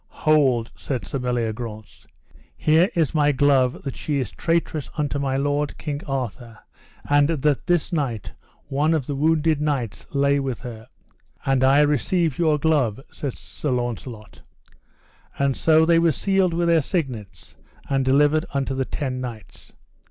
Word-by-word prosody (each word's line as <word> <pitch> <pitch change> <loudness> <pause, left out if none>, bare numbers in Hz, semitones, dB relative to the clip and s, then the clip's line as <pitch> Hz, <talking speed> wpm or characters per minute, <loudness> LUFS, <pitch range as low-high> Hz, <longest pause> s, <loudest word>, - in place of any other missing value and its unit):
Hold, 135 -7 +3
said 130 -4 -4
Sir 135 - -4
Meliagrance, 115 -3 -4 0.5
here 160 +5 +4
is 160 -5 +1
my 145 -2 +3
glove 135 -2 +2
that 135 - -5
she 150 -2 -2
is 130 - -3
traitress 165 -3 -1
unto 145 -2 -1
my 135 -1 -1
lord, 145 +1 -1
King 145 -1 -4
Arthur, 125 -4 -4 0.5
and 145 0 +4
that 150 -1 0
this 175 0 +1
night 125 - -2 0.4
one 150 +3 +1
of 145 -5 -1
the 145 - -3
wounded 155 +1 +2
knights 135 -8 -2
lay 140 0 +2
with 135 -4 -3
her. 115 -2 -9 0.6
And 135 -1 +2
I 135 +2 +5
receive 150 +2 +1
your 155 -3 +3
glove, 145 -8 +1
said 140 -4 -5
Sir 150 - -6
Launcelot. 120 -3 -4 1.0
And 140 -1 +1
so 160 0 +4
they 165 0 +4
were 165 -1 +3
sealed 190 +1 +1
with 170 0 +1
their 165 -1 +4
signets, 120 - -4 0.3
and 135 -1 +1
delivered 145 +4 +3
unto 135 -1 -1
the 130 0 -1
ten 130 -2 -3
knights. 115 -6 -9
140 Hz, 150 wpm, -23 LUFS, 125-155 Hz, 1.0 s, I